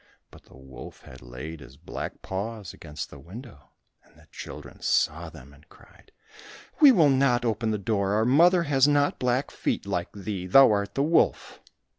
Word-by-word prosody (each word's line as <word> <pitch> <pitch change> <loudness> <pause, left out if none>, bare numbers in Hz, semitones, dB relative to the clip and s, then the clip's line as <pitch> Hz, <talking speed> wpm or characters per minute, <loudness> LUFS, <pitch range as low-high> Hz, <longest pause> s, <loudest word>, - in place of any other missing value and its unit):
But - - -17
the - - -18
wolf 65 -2 -12
had 65 - -14
laid 65 +6 -9
his 65 -1 -15
black - - -8
paws 100 0 -6
against 75 -2 -8
the 70 - -12
window, 95 - -13 0.3
and - - -27
the - - -20
children - - -10
saw - - 0
them 65 +3 -15
and 75 +2 -22
cried, - - -21 0.7
"We 295 -3 +8
will 165 - +4
not 130 -2 +2
open 110 0 -1
the 110 - -1
door, 100 -1 -1
our 110 +2 +1
mother 170 +7 +4
has 140 -3 +3
not 145 -1 +1
black 125 +2 -1
feet - - -3
like 85 0 -3
thee; 95 -2 -6
thou 135 +6 +7
art 100 -1 -2
the 140 - +1
wolf." 160 +3 +1
105 Hz, 180 wpm, -25 LUFS, -, 0.7 s, We